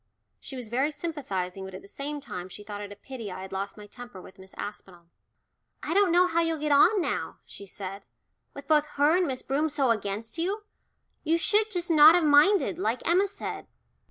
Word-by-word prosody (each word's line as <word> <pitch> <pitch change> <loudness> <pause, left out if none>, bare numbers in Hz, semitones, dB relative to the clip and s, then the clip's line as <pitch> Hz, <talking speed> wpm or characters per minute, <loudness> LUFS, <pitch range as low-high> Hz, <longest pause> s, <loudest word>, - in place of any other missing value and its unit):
She 270 - -9
was 245 -4 -7
very 265 +5 +1
sympathising, 255 - -4
but 190 -1 -8
at - - -10
the - - -14
same 290 +7 -5
time 180 -9 -7
she 205 +3 -10
thought 205 0 -7
it 205 0 -7
a - - -8
pity 230 -1 -8
I 185 +1 -7
had 190 - -9
lost 195 +2 -4
my 210 - -10
temper 240 -1 -11
with 185 +1 -14
Miss 190 0 -14
Aspinall. 180 -4 -9 0.7
"I - - -2
don't 395 -1 +4
know 355 +2 +5
how 335 -1 +1
you'll 330 -1 0
get 300 0 -2
on 360 +9 +5
now," - - -3
she 200 - -11
said, 195 +1 -8 0.5
"with 280 - -9
both 300 -1 +3
her 295 +4 +4
and 365 -2 +1
Miss 260 -1 -4
Broom 295 +4 0
so 280 -4 +1
against 215 +5 -3
you. 395 +6 -1 0.6
You 325 +1 +2
should 420 +5 +2
just 355 -3 -2
not 310 +1 +8
have 350 - +3
minded 315 +5 +4
like 250 -9 -1
Emma 365 +4 +4
said." 390 - -6
275 Hz, 215 wpm, -27 LUFS, 205-330 Hz, 0.7 s, not